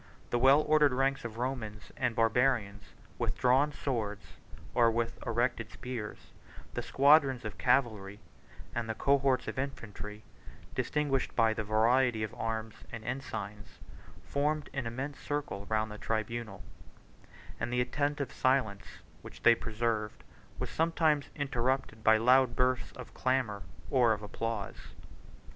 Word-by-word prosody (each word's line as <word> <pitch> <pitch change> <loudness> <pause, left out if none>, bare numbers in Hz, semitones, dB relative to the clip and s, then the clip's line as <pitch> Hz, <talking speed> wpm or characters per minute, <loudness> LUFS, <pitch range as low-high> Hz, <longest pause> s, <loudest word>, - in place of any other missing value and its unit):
The 120 - +2
well 135 +4 +6
ordered 150 -3 +4
ranks 135 +1 +1
of 115 -1 -6
Romans 115 -4 -4
and 120 -2 -1
Barbarians, 115 -3 +1 0.3
with - - -1
drawn 130 +4 +3
swords, 110 -8 -3 0.5
or 120 -2 +5
with 115 0 -2
erected 120 +2 0
spears, 120 -4 -7 0.4
the - - -2
squadrons 140 -3 +4
of 105 - -6
cavalry, 105 -6 +1 0.5
and 115 -1 -3
the 110 - -2
cohorts 135 0 +2
of - - -3
infantry, 110 -6 -6 0.5
distinguished 145 -3 -1
by 115 -2 +4
the 110 - -3
variety 115 +2 +3
of 110 - -3
their - - -14
arms 110 -1 -2 0.2
and 115 -2 -7
ensigns, 105 -5 -6 0.5
formed 145 +8 -1
an 135 -4 -2
immense 135 +5 -5
circle 145 -9 -4
round 110 0 0
the 105 - -8
tribunal; 110 -2 -3 1.0
and 115 - -2
the 125 - +1
attentive 145 +3 -1
silence 130 -7 +1 0.4
which - - -12
they 120 - +8
preserved 110 -2 -2 0.3
was - - -4
sometimes 160 -3 +1
interrupted 130 -4 -1
by 110 0 +6
loud 125 +1 +4
bursts 125 0 +1
of 125 - -10
clamor 130 -6 0 0.3
or 120 -4 +4
of 105 0 -6
applause. 110 -1 -5
120 Hz, 135 wpm, -31 LUFS, 110-135 Hz, 1.0 s, they